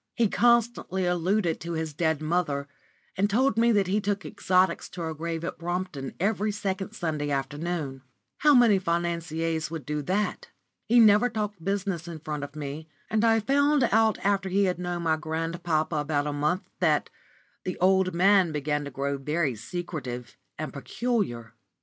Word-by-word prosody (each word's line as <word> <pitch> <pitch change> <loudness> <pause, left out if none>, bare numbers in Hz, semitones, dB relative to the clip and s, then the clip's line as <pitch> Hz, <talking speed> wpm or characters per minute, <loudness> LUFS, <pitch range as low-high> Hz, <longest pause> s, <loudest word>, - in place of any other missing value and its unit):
He 230 - +3
constantly 235 -6 +2
alluded 175 0 +1
to 170 +1 -5
his 160 -1 -3
dead 160 0 0
mother, 155 -4 0 0.5
and 200 +2 +1
told 260 +6 +2
me 235 +1 +4
that 200 -2 +3
he 200 +3 0
took 205 0 -2
exotics 185 -1 +1
to 180 - -8
her 160 -1 -3
grave 165 +1 -4
at 170 - -5
Brompton 175 -5 -4
every 210 +2 +1
second 200 -1 -3
Sunday 155 -7 -2
afternoon. 145 0 -3 0.4
How 295 -1 +6
many 230 -6 +6
financiers 170 -2 -1
would 160 -2 -6
do 150 0 -2
that? 190 +8 -2 0.4
He 240 +1 +5
never 215 +2 +6
talked 210 -5 -4
business 195 -3 -2
in 170 -2 -6
front 150 -2 -5
of 145 +1 -8
me, 150 +1 -6 0.2
and 220 0 +2
I 225 -1 +4
found 285 +3 +3
after 205 -4 +2
he 200 +2 +2
had 180 -2 0
known 175 -1 -3
my 160 -1 +2
grandpapa 160 0 -1
about 145 0 0
a 150 - -2
month 150 +6 -1
that - - +2 0.5
the 185 - -4
old 190 0 +3
man 185 0 +4
began 150 0 -1
to - - -5
grow 140 +1 -2
very 150 0 0
secretive 125 -1 -6 0.2
and 155 0 -5
peculiar. 140 - -2
175 Hz, 165 wpm, -27 LUFS, 155-200 Hz, 0.5 s, How